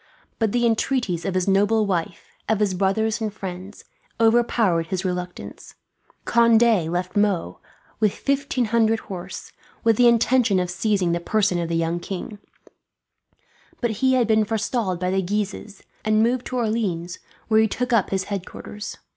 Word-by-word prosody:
But 220 -3 +1
the 240 +1 +1
entreaties 225 -7 0
of 195 - -2
his 185 0 0
noble 205 +3 +3
wife, 175 -3 -3 0.2
of 220 -2 +2
his 205 -3 +1
brothers 210 +4 0
and 215 -1 -1
friends, 190 0 -8 0.4
overpowered 225 -7 +2
his 185 +2 -3
reluctance. 180 -1 -6 0.5
Conde 230 -6 +4
left 180 +1 -3
Meaux, 195 - 0 0.4
with 215 -2 +3
fifteen 275 -1 -1
hundred 225 0 +2
horse, 185 -2 -8 0.3
with 225 -2 +3
the 245 - +6
intention 235 -3 +3
of 180 -1 -2
seizing 190 -2 0
the 170 - 0
person 200 0 +1
of 170 -1 -3
the 170 - -1
young 165 +1 -1
king; 195 +3 -6 1.4
but 240 -2 0
he 260 0 +4
had 250 -2 +3
been 220 -1 +3
forestalled 220 -3 -1
by 180 0 -1
the 190 0 +1
Guises, 205 +1 -4 0.2
and 215 0 +3
moved 245 +2 0
to 255 - -3
Orleans, 200 -7 -2 0.3
where 220 -1 +4
he 220 - +4
took 250 +3 -2
up 220 -5 +3
his 190 -1 -1
headquarters. 205 +1 -7
210 Hz, 160 wpm, -23 LUFS, 185-225 Hz, 1.4 s, the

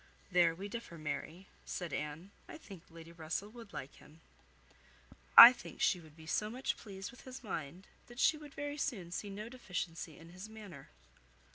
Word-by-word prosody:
"There 175 -2 +4
we 195 +4 -6
differ, 205 -6 -7
Mary," 155 +4 -5 0.2
said 170 -5 -5
Anne. 150 +6 -5 0.2
"I - - -9
think 195 - -12
Lady 165 0 -12
Russell 165 +5 -4
would 230 -2 -12
like 135 - -7
him. 155 +2 -17 1.2
I 235 +2 +15
think - - -11
she 180 - +3
would 160 -2 -16
be 160 - -12
so 210 +7 -1
much 250 +4 -2
pleased 195 -2 -8
with 250 - -15
his 260 -1 -10
mind, 180 -2 -5 0.2
that 240 - -13
she 310 - +5
would 295 -2 -12
very 290 0 -4
soon 195 -12 -3
see 205 +3 -4
no 205 +2 -6
deficiency 180 - -5
in 165 +1 -13
his 185 +5 -9
manner." 205 -11 -11
185 Hz, 180 wpm, -35 LUFS, 165-225 Hz, 1.2 s, I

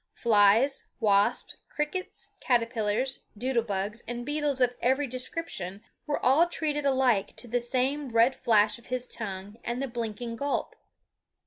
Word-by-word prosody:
Flies, 225 +4 +4
wasps, 205 -3 +2
crickets, 300 +5 -4
caterpillars, 230 +1 +1 0.2
doodle 245 +1 +1
bugs, 205 +1 -3
and 240 +1 -4
beetles 290 -2 0
of 250 -1 +3
every 265 +4 +2
description 250 - -5 0.2
were 295 - 0
all 285 +7 +5
treated 295 -4 -1
alike 255 -7 +2
to 245 - -7
the 245 +1 0
same 260 +4 -1
red 230 +3 +4
flash 215 -2 +3
of 235 - -19
his 250 0 -3
tongue 205 -3 -7
and 240 +1 -2
the 275 - -1
blinking 230 -1 -4
gulp. 285 +2 -2
245 Hz, 140 wpm, -28 LUFS, 220-270 Hz, 0.2 s, all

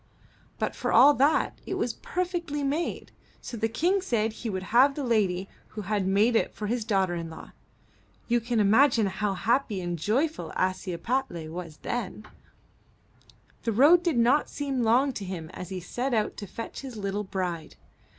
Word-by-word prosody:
But - - -2
for - - -2
all 290 - +8
that 285 +3 +2
it - - -2
was - - -1
per 420 -7 -2
fectly 335 -5 -3
made, 300 +5 -2 0.3
so - - -7
the 225 0 0
King 355 - +1
said 225 - 0
he 230 - -5
would 190 -2 -3
have 270 +3 +6
the 290 - -3
lady 195 -6 +1 0.2
who 215 - -7
had 200 -1 -1
made 210 +5 +3
it - - +1
for 210 - -5
his 235 +2 -1
daughter 195 -4 +1
in 170 -1 -4
law. 160 - -11 0.8
You 240 0 +3
can 235 0 -1
imagine 225 +3 +4
how 195 +1 -1
happy 230 0 +1
and 175 -2 -3
joyful 235 - -1
Ashiepattle 185 0 -2
was 165 -2 -7
then. 215 -2 -4 1.4
The 230 - -1
road 295 +10 +6
did 340 -7 0
not 245 +6 +3
seem 275 -3 -2
long 250 +4 +3
to 210 - -5
him 175 -4 -6
as 180 - -8
he 190 -1 -4
set 245 +8 -2
out 215 -1 0
to 205 - -6
fetch 230 - -7
his 260 -4 -8
little 200 0 -2
bride. 180 -4 -4
225 Hz, 180 wpm, -27 LUFS, 190-270 Hz, 1.4 s, all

